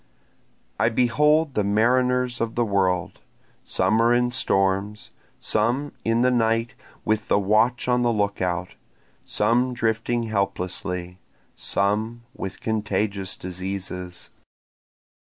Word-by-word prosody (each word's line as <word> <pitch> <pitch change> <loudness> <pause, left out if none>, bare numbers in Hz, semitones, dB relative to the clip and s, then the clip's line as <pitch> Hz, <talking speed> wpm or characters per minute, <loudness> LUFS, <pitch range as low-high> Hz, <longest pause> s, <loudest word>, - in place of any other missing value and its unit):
I 110 +2 +3
behold 150 +6 +2
the 105 - +1
mariners 125 +4 +2
of 115 -1 -2
the 120 - +2
world, 95 -4 0 0.4
Some 95 +5 +2
are 115 +1 +4
in 120 0 +2
storms, 100 -3 +1 0.3
some 120 +7 0
in 115 +1 +1
the 125 - +4
night 115 -1 +1 0.3
with 110 0 0
the - - +3
watch 110 +6 +2
on 125 0 +2
the 120 -1 +2
lookout, 95 -4 -1 0.5
Some 125 +2 +1
drifting 115 +1 0
helplessly, 90 -3 -2 0.4
some 110 +4 -1
with 95 - -7
contagious 105 -3 -1
diseases. 90 -1 -5
110 Hz, 110 wpm, -24 LUFS, 95-120 Hz, 0.5 s, are